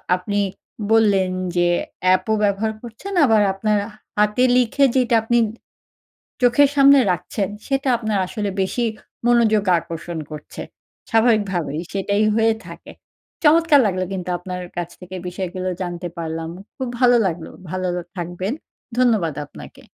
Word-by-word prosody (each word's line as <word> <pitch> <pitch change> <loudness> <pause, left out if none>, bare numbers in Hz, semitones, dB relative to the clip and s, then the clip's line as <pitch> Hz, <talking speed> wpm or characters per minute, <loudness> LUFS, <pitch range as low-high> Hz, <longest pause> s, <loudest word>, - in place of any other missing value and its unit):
আপনি 205 +3 -2 0.5
বললেন 205 -4 +4 0.3
যে 175 0 +3 0.5
এপ - - -3
ও - - +4
ব্যবহার 205 +2 +1
করছেন। 240 - -8
আবার 220 -4 +4
আপনার 210 +2 0 0.4
হাতে 210 +4 +3
লিখে 255 +3 +3
যেটা 245 -2 +3
আপনি 240 +1 +2 1.0
চোখের 250 +3 +5
সামনে 280 0 +7
রাখছেন 195 +2 -2 0.2
সেটা 270 0 0
আপনার 220 -3 -1
আসলে 205 0 -3
বেশি 215 +6 -1 0.4
মনোযোগ 225 -3 +4 0.2
আকর্ষণ 170 0 -6
করছে। 150 -1 -8 0.5
স্বাভাবিকভাবেই 205 - +1
সেটাই 200 +2 0
হয়ে 225 0 +3
থাকে। - - -11 0.5
চমৎকার 315 -1 +5
লাগল 185 -2 0
কিন্তু 180 -1 -4
আপনার 180 +1 -6 0.2
কাছ 175 -1 -3
থেকে 180 +1 -9
বিষয়গুলো 185 0 -4
জানতে 175 -1 -4
পারলাম। 165 0 -4 0.3
খুব 260 - -3
ভালো 245 -1 +5
লাগল। 170 -3 -2 0.3
ভালো 185 -1 -2 0.2
থাকবেন। 175 +5 -3 0.4
ধন্যবাদ 220 -11 +2
আপনাকে। 70 - -13
205 Hz, 130 wpm, -21 LUFS, 180-240 Hz, 1.0 s, সামনে